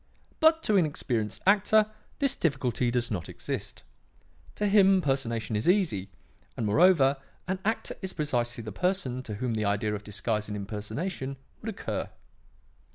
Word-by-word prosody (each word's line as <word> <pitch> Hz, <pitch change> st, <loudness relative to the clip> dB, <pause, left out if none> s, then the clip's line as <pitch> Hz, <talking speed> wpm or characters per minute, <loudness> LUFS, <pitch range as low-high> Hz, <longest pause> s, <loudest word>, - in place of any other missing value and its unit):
But 320 Hz, +1 st, +5 dB
to 210 Hz, -, +3 dB
an 180 Hz, -, +5 dB
experienced 115 Hz, -7 st, -2 dB
actor 210 Hz, +2 st, +4 dB, 0.3 s
this 275 Hz, -2 st, +2 dB
difficulty 130 Hz, -6 st, 0 dB
does 120 Hz, -1 st, +1 dB
not 90 Hz, -5 st, -3 dB
exist. -, -, -5 dB, 0.7 s
To 210 Hz, -, -1 dB
him, 195 Hz, -2 st, +5 dB
personation 115 Hz, -8 st, -1 dB
is 105 Hz, +10 st, +1 dB
easy; 155 Hz, -, +2 dB, 0.5 s
and, 115 Hz, -, -1 dB
moreover, 140 Hz, -, +5 dB, 0.3 s
an 185 Hz, 0 st, -1 dB
actor 220 Hz, +2 st, -1 dB
is 190 Hz, -1 st, -4 dB
precisely 120 Hz, -7 st, -1 dB
the 110 Hz, -, -6 dB
person 180 Hz, -, -1 dB
to 110 Hz, -5 st, -6 dB
whom 120 Hz, +3 st, -2 dB
the 110 Hz, -1 st, -1 dB
idea 105 Hz, +1 st, 0 dB
of 105 Hz, 0 st, -4 dB
disguise 105 Hz, +1 st, -2 dB
and 105 Hz, 0 st, -4 dB
impersonation 115 Hz, -, -4 dB, 0.2 s
would 225 Hz, -, -4 dB
occur. 215 Hz, -, -4 dB
130 Hz, 155 wpm, -28 LUFS, -, 0.7 s, But